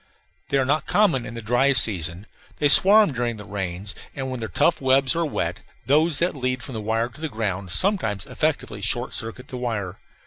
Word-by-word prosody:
They 140 - +1
are 135 - +1
not 150 +4 0
common 180 - +2
in 115 - -8
the 115 - -7
dry 125 +5 +2
season. 90 - +1 0.3
They 145 - +2
swarm 200 +1 +7
during 120 -2 -2
the 105 - -10
rains; 95 0 -4 0.2
and, 130 -1 -4
when 130 - -5
their 110 - -5
tough 170 - +1
webs 130 +1 +2
are 165 -1 0
wet, - - -3 0.3
those 155 +3 +3
that 175 -1 0
lead 130 -2 -2
from 135 - -8
the 110 - -5
wire 115 +2 -1
to 140 +6 -16
the 160 - -3
ground 100 -6 -4
sometimes 105 - +1
effectually 145 -9 -3
short 120 +5 -1
circuit 115 +3 -4
the 130 - -6
wire. 105 -6 -4
125 Hz, 205 wpm, -23 LUFS, 105-145 Hz, 0.3 s, swarm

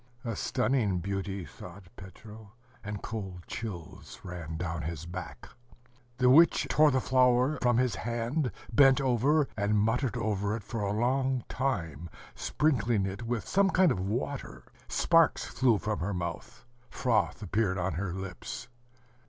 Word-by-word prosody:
"A 115 -2 -2
stunning 125 -5 0
beauty!" 95 +1 -3
thought 100 +5 -11
Petro; 105 +2 -12 0.3
and 105 -1 -6
cold 95 -5 -6
chills 95 -8 -7
ran 85 -3 -6
down 85 -2 -3
his 80 +1 -5
back. 90 +1 -8 0.7
The 125 - +3
witch 160 +7 +6
tore 155 0 +6
the 130 -2 +2
flower 130 +2 +3
from 120 -2 +3
his 125 -2 +2
hand, 120 +4 -2 0.2
bent 135 +3 +6
over, 135 +3 +2
and 105 0 +1
muttered 120 +4 +1
over 105 -2 -1
it 115 - -6
for 110 +2 -5
a 100 -1 -1
long 130 +3 +1
time, 85 - -3 0.2
sprinkling 120 -9 +1
it 95 +3 -5
with 115 -1 -3
some 195 0 +3
kind 185 -2 +4
of 110 - -1
water. 120 +8 -4 0.2
Sparks 165 -1 +3
flew 125 -5 +2
from 105 +1 -2
her 95 +3 -2
mouth, 85 +5 -6 0.2
froth 115 -3 0
appeared 100 0 0
on 90 -1 -1
her 90 +3 -3
lips. 95 +4 -7
110 Hz, 145 wpm, -29 LUFS, 95-130 Hz, 0.7 s, witch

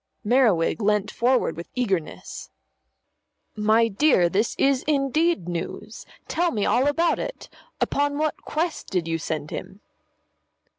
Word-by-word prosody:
Merriwig 225 -6 +3
leant 210 0 +1
forward 250 -7 +1
with 170 +1 -8
eagerness. 195 -10 -3 1.1
"My 220 +2 +3
dear, 210 - +3
this 205 +5 0
is 270 -1 +2
indeed 300 - +1
news. 175 0 -6 0.2
Tell 345 +2 +1
me 210 -9 -1
all 255 +4 +2
about 330 +4 +2
it. - - -6 0.3
Upon 285 0 0
what 310 0 -1
quest 320 +2 -3
did 180 -3 -1
you 165 0 -1
send 155 -1 -4
him?" 195 - -7
230 Hz, 130 wpm, -24 LUFS, 190-290 Hz, 1.1 s, Merriwig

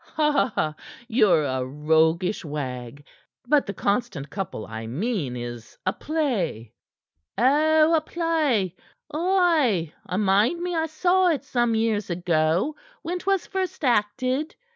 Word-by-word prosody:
"Ha! 290 - +1 0.3
Ye're 215 -9 +4
a 130 -2 -1
roguish 160 +8 +1
wag! 140 -3 -6 0.4
But 295 +1 +3
'The 200 - -4
Constant 195 - -1
Couple' 190 - -5
I 110 +1 -7
mean 155 - -2
is 120 -1 -8
a 185 - +1
play." 205 - -2 0.6
"Oh, 310 +5 +4
a 320 - +4
play! 305 - 0 0.4
Ay, 315 - +2
I 180 - -2
mind 210 - +3
me 355 0 -3
I 320 0 0
saw 360 +4 +2
it 320 -5 +1
some 240 -2 +1
years 220 -3 0
ago, 170 - +1 0.3
when 355 +2 -3
'twas 390 0 0
first 375 -4 -4
acted. 255 +6 0
215 Hz, 125 wpm, -24 LUFS, -, 0.6 s, Ye're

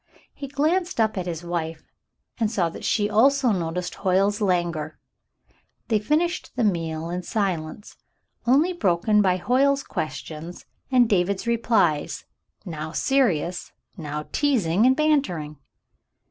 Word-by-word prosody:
He 280 - -7
glanced 315 +5 0
up 220 -1 +2
at 185 -2 -3
his 170 -1 -4
wife 165 -2 -4 0.5
and 220 -2 +1
saw 185 -6 0
that - - -10
she 205 -2 +1
also 255 +4 +3
noticed 175 -1 -2
Hoyle's 195 +2 +2
languor. 175 -5 -1 0.9
They 220 -2 +3
finished 315 - -1
the 250 - 0
meal 165 -4 -1
in 180 - -2
a - - -8
silence 185 -2 -3 0.5
only 295 +9 +4
broken 210 - +2
by 185 -2 +2
Hoyle's 275 +7 +2
questions 155 +2 -6 0.3
and 250 -2 +5
David's 195 0 0
replies, 220 -10 +1 0.4
now 155 -3 -5
serious, 185 - 0 0.2
now 150 -4 -5
teasing 230 - +2
and 260 - +4
bantering. 265 - 0
195 Hz, 130 wpm, -24 LUFS, 170-250 Hz, 0.9 s, and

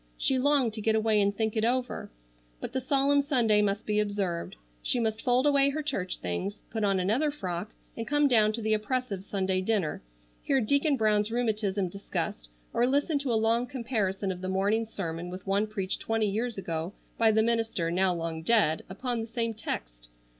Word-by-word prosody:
She 265 -1 +1
longed 275 -4 +3
to 215 - -5
get 220 +1 +2
away 220 -1 +3
and 200 0 +3
think 220 +2 -2
it 220 - +1
over, 250 +2 -1 0.5
but - - -6
the 260 - -1
solemn 280 +2 +3
Sunday 240 -7 +3
must 200 +1 -1
be 210 0 +1
observed. 200 - -2 0.3
She 245 - +1
must 220 -1 -1
fold 250 +1 +2
away 280 -1 +4
her 305 +2 -3
church 185 -11 -2
things, 135 - -4
put 220 -1 -2
on 195 -2 +2
another 225 +12 +1
frock 195 -8 -4 0.3
and 230 - -5
come 295 0 +3
down 220 -5 +5
to 225 0 -3
the 220 0 +2
oppressive 215 -2 -2
Sunday 190 -2 -1
dinner, 190 -5 -1 0.4
hear 275 -2 +2
Deacon 280 +5 +2
Brown's 210 -2 +2
rheumatism 215 -5 0
discussed, 170 - -4 0.2
or 240 - +2
listen 285 +3 +1
to 275 -3 -1
a - - +2
long 230 +2 +2
comparison 215 -7 -2
of 180 -1 -7
the 185 - -3
morning's 205 +4 +1
sermon 170 -3 -4
with 185 +1 -8
one 200 +2 +1
preached 195 -3 -2
twenty 225 -1 0
years 225 +3 -2
ago 165 -1 -3 0.3
by 225 -1 +5
the 220 0 +3
minister, 225 -7 0
now 185 +1 +3
long 165 -2 -3
dead 180 -5 +2
upon 235 +4 -2
the 225 - -5
same 230 0 -2
text. - - -6
215 Hz, 195 wpm, -28 LUFS, 195-245 Hz, 0.5 s, down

